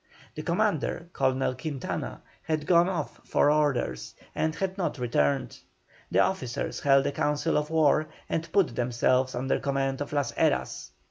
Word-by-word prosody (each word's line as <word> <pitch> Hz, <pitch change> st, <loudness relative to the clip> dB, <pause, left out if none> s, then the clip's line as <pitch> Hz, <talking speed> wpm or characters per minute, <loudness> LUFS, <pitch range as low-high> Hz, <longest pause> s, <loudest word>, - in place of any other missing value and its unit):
The 155 Hz, -, -5 dB
commander, 170 Hz, -1 st, 0 dB
Colonel 130 Hz, -1 st, +1 dB
Quintana, 135 Hz, 0 st, -4 dB, 0.2 s
had 155 Hz, -1 st, -2 dB
gone 175 Hz, +1 st, +5 dB
off 165 Hz, -6 st, -4 dB
for 145 Hz, -, +3 dB
orders 120 Hz, -, 0 dB, 0.2 s
and 160 Hz, 0 st, -1 dB
had 190 Hz, -1 st, -2 dB
not 185 Hz, -5 st, -2 dB
returned. 95 Hz, -, 0 dB, 0.5 s
The -, -, +3 dB
officers 130 Hz, -11 st, -1 dB
held 135 Hz, -1 st, +4 dB
a 140 Hz, -, +1 dB
council 150 Hz, +3 st, 0 dB
of 150 Hz, 0 st, 0 dB
war 155 Hz, -1 st, +3 dB, 0.2 s
and 165 Hz, 0 st, -3 dB
put 185 Hz, -, +2 dB
themselves 125 Hz, +2 st, +1 dB
under 130 Hz, +2 st, 0 dB
command 135 Hz, 0 st, -1 dB
of 145 Hz, -, -4 dB
Las 145 Hz, -4 st, 0 dB
Heras. -, -, 0 dB
145 Hz, 150 wpm, -27 LUFS, 130-160 Hz, 0.5 s, gone